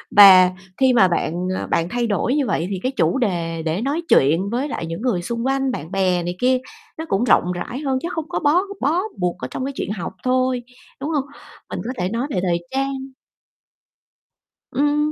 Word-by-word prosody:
Và 185 -3 +9 0.3
khi 260 -1 +4
mà 195 -6 +6
bạn, 175 0 -1
à, - - -4
bạn 170 +1 0
thay 240 +1 -1
đổi 220 - 0
như 285 -4 +1
vậy 170 - 0
thì 190 -2 -3
cái 255 - 0
chủ 270 0 +1
đề 170 -8 -1
để 165 +5 -1
nói 285 +6 -1
chuyện 165 +8 +4
với 250 +6 -1
lại 170 - -4
những 165 +5 -5
người 240 -9 0
xung 235 +6 -3
quanh 270 0 +1
bạn 160 - -6
bè 185 -3 +1
này 175 +1 -3
kia 255 +1 +3 0.4
nó 320 - -4
cũng 195 -1 +1
rộng 180 -7 +3
rãi 235 +9 -5
hơn, 270 -3 0
chứ 340 - -3
hông 320 0 -4
có 350 - -1
bó 300 +5 +3 0.2
bó 315 +7 +2 0.2
buộc 180 -1 -1
ở 130 - -4
trong 260 - -3
cái 275 - -4
chuyện - - -3
học 200 -5 -5
thôi, 255 -1 +1 0.4
đúng 285 +3 -3
hông? 290 -4 0 0.4
Mình - - -4
có 245 - -2
thể 180 -2 -1
nói 235 +5 -2
về 190 - -1
thời 170 -1 -1
trang 275 +1 -1 1.8
Ừm, 295 +3 +1
235 Hz, 215 wpm, -21 LUFS, 180-270 Hz, 1.8 s, Và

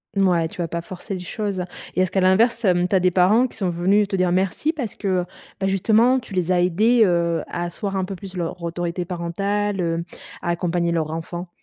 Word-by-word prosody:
Mouais 180 -4 +3
tu 175 - -7
vas 165 - -2
pas 170 +1 -3
forcer 185 +4 -8
les - - -5
choses 200 +1 -3 0.3
et 185 - +2
est-ce 185 - +2
qu'à 190 - +1
l'inverse, 210 +7 +3
hem, 180 -3 +3
tu 195 - 0
as 185 - +4
des 180 0 +3
parents 195 +8 +4
qui - - -12
sont 190 -3 0
venus 190 +4 +2
te 195 - -2
dire 185 -1 +2
merci 190 - +1
parce 270 - -5
que, 185 -3 0 0.3
bah 195 - 0
justement 225 +6 +3
tu 210 - -12
les 180 -1 +1
as 175 - +3
aidés, 215 +7 +3
heu, 170 -3 +2
à 175 - -3
asseoir 195 +3 -3
un 190 - 0
peu 195 +1 -6
plus 190 0 -9
leur 170 0 -4
autorité 170 +1 -2
parentale, 195 +3 -2
heu, 165 0 -1 0.4
à - - -3
accompagner 170 0 0
leur 160 -2 -1
enfant? 170 +2 -5
185 Hz, 225 wpm, -22 LUFS, 175-200 Hz, 0.4 s, as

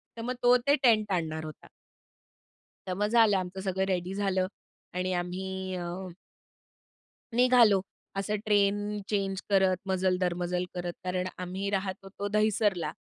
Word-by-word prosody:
तर 230 - -6
मग 250 - -1
तो 245 0 +7
ते 285 - +6
टेंट 215 -4 +4
आणणार 160 -1 -4
होता. - - -19 1.2
तर 185 - -1
मग 210 +2 +1
झालं, 220 -3 +5
आमचं 185 +1 -4
सगळं 190 0 -1
रेडी 180 0 -1
झालं 195 -2 0 0.5
आणि 185 +1 -1
आम्ही 185 +1 -3
अ, 175 -1 -4 1.5
निघालो 240 -5 +6 0.4
असं 205 +2 -1
ट्रेन 205 -1 +3 0.3
चेंज 195 -2 -1
करत, 190 -2 +4
मजल 185 -1 +1
दर 180 -1 +2
मजल 180 0 -1
करत. 175 -1 -3
कारण 180 0 -1
आम्ही 185 +2 -3
राहत 195 -1 -1
होतो 200 +1 -5
दहिसरला 210 -5 +1
190 Hz, 140 wpm, -29 LUFS, 180-205 Hz, 1.5 s, तो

